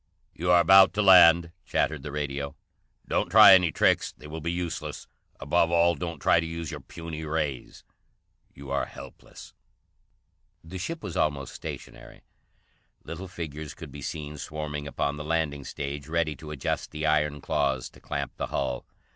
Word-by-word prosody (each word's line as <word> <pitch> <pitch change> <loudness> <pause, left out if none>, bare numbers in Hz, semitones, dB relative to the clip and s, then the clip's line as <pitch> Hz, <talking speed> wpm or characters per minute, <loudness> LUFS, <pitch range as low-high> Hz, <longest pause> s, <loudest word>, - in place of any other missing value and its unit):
"You 90 +2 -3
are 90 0 +7
about 95 +4 +7
to 105 - +2
land," 85 -3 +7
chattered 75 -3 -1
the 75 - -7
radio. 70 -1 -4 0.5
"Don't - - 0
try - - +9
any 90 -3 +5
tricks; - - +2
they - - -14
will 80 +2 -7
be 85 +2 -2
useless. 85 -1 -4 0.3
Above 80 +4 +2
all, 85 0 +4
don't 85 -1 -5
try 75 - +3
to 85 - -2
use 85 -1 -5
your - - -6
puny 80 -2 -8
ray. 75 -4 -2 0.9
You 70 0 -10
are - - 0
helpless." - - -12 1.1
The 90 +3 -8
ship 165 - -5
was 85 - -6
almost 70 -3 -1
stationary. 60 -1 -9 0.8
Little 90 +3 -7
figures 80 -4 -7
could 80 -4 -10
be 70 +1 -9
seen 75 +1 -6
swarming 75 -1 -5
upon 70 0 -2
the 75 - -6
landing 75 -3 -1
stage, 70 +1 -6
ready 80 -1 0
to 75 - -10
adjust 75 -3 -3
the 75 0 -4
iron 75 -1 +1
claws 70 -2 -1
to - - -18
clamp - - -4
the - - -3
hull. 65 -3 -3
75 Hz, 165 wpm, -27 LUFS, 70-85 Hz, 1.1 s, try